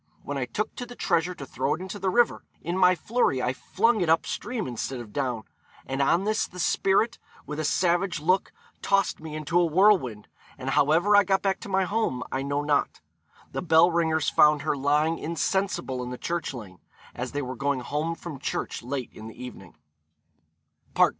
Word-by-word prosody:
When 145 - -4
I 135 -2 -1
took 210 - -3
the 245 0 -7
treasure 175 -3 0
to 140 - -8
throw 130 +2 -1
it - - -11
into 190 +2 -6
the 190 0 0
river, 240 +4 +2 0.2
in 170 +3 -2
my 185 -1 +5
flurry 215 - +1
I 125 0 0
flung 220 - +1
it 170 - +1
up 165 - +3
stream 240 -4 -3
instead 125 +1 -4
of 115 -3 -10
down: 125 -6 -2 0.4
and 135 +1 -2
on 170 +7 +3
this 215 +2 0
the 180 - -14
spirit, 195 +6 +2 0.3
with 150 +1 -5
a - - -1
savage 175 +3 +1
look, 185 +5 +1 0.3
tossed 195 0 +1
me 155 -1 -7
into 155 +3 0
a 175 - +4
whirlwind, 165 - +3 0.3
and 135 -1 -3
however 160 +9 +4
I 205 - +7
got 195 0 +1
back 195 -1 +1
to - - -9
my 190 0 +2
home 185 - -1
I 135 - -1
know 140 +1 -1
not.' 145 -1 0 0.5
The - - -3
bell 165 0 +5
ringers 160 -2 +1
found 150 -1 +4
her 155 - 0
lying 150 +4 +1
insensible 165 -5 -1
in 125 - -5
the 125 - -5
church 170 +4 -3
lane, 105 -8 -10 0.3
as 125 +2 -5
they 145 0 -2
were 130 0 -5
going 140 +1 -1
home 150 +6 -2
from 165 -5 -8
church - - -3
late 125 +1 -4
in 110 - -10
the 110 - -10
evening. 125 -8 -10
160 Hz, 195 wpm, -26 LUFS, 135-190 Hz, 0.5 s, I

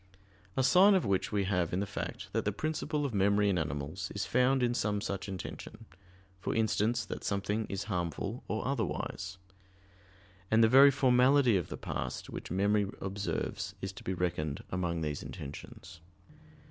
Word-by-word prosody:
A 130 - +3
sign 190 +8 +6
of 185 - +2
which 100 -2 0
we 100 -2 +1
have 90 -4 0
in 90 - +1
the 100 - 0
fact - - -6
that - - +1
the 105 - 0
principle 150 +4 -2
of 135 - -3
memory 100 +1 +3
in 90 -3 +1
animals 75 +5 -4
is 100 -1 -1
found 125 +4 +3
in 120 0 +2
some 105 -3 0
such 100 0 -4
intention, 95 -2 -7 0.5
for - - -2
instance, 110 +1 +1
that - - -6
something 105 +2 -1
is 100 +1 -3
harmful 100 +3 -3
or 110 - -2
otherwise. 100 -6 -3 1.1
And 110 +1 +5
the - - +7
very 135 +4 +8
formality 130 -2 +4
of 90 -4 0
the - - -6
past, - - -5
which - - -6
memory 100 +2 +2
observes, 95 -3 -3
is 95 0 -5
to 95 - -11
be 95 - -2
reckoned 85 -5 -2
among 85 -2 -1
these 75 -2 -2
intentions. 75 +3 -9
100 Hz, 170 wpm, -31 LUFS, 95-120 Hz, 1.1 s, very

